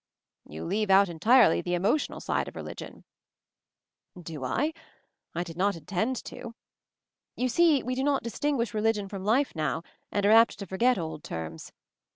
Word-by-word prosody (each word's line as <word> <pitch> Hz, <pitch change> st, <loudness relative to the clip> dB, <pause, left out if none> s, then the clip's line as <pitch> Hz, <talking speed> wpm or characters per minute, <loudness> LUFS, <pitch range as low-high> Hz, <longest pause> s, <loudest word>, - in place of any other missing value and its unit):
"You 80 Hz, +2 st, -7 dB
leave 210 Hz, +3 st, -1 dB
out 195 Hz, 0 st, +6 dB
entirely 220 Hz, +9 st, +4 dB
the 175 Hz, 0 st, -1 dB
emotional 205 Hz, -, 0 dB
side -, -, -1 dB
of -, -, -9 dB
religion." -, -, -8 dB, 1.2 s
"Do 160 Hz, -5 st, -7 dB
I? 290 Hz, -, 0 dB, 0.6 s
I 175 Hz, -, -1 dB
did 165 Hz, -2 st, -9 dB
not 200 Hz, +2 st, +1 dB
intend 195 Hz, -, -2 dB
to. 235 Hz, -2 st, -8 dB, 0.8 s
You 255 Hz, -, 0 dB
see, 310 Hz, +1 st, +3 dB
we 255 Hz, -, -2 dB
do 260 Hz, +1 st, -1 dB
not 280 Hz, -1 st, +1 dB
distinguish 235 Hz, 0 st, -1 dB
religion 215 Hz, -1 st, 0 dB
from 195 Hz, -1 st, -7 dB
life 240 Hz, +5 st, +1 dB
now, 160 Hz, +1 st, -1 dB, 0.3 s
and 205 Hz, -1 st, 0 dB
are 205 Hz, -, +5 dB
apt 225 Hz, -1 st, +6 dB
to 200 Hz, -, -6 dB
forget 230 Hz, +7 st, +2 dB
old 160 Hz, -3 st, -5 dB
terms. 80 Hz, -1 st, -7 dB
205 Hz, 165 wpm, -28 LUFS, 175-250 Hz, 1.2 s, out